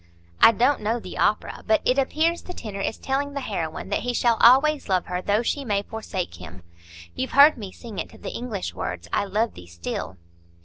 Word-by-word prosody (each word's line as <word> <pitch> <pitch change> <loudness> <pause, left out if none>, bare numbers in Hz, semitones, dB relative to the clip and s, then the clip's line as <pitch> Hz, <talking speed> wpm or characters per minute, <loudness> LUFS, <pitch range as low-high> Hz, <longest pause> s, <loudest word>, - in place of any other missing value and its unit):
I - - +9
don't 250 +4 +2
know 225 +3 0
the 185 - -8
opera, 210 - 0
but 220 0 +4
it 255 +2 +3
appears 320 +5 +1
the 360 - -9
tenor 200 -3 -6
is 220 - -2
telling 280 +1 -2
the 280 - -3
heroine 175 -8 -4
that 205 - 0
he 245 0 -2
shall 235 -1 +3
always 275 +3 +5
love 185 -2 +1
her 180 0 -3
though 205 +4 +1
she 280 +4 -1
may 205 -5 0
forsake 190 - -5
him. 90 +1 -11 0.5
You've 260 - -4
heard 285 +3 +8
me 205 -5 -8
sing 225 -1 -9
it - - -4
to - - -15
the - - -6
English 225 -6 -4
words, 85 -1 -5
'I - - +1
love 215 +4 0
thee 90 - -12
still. 85 +2 -5
220 Hz, 215 wpm, -24 LUFS, 185-260 Hz, 0.5 s, I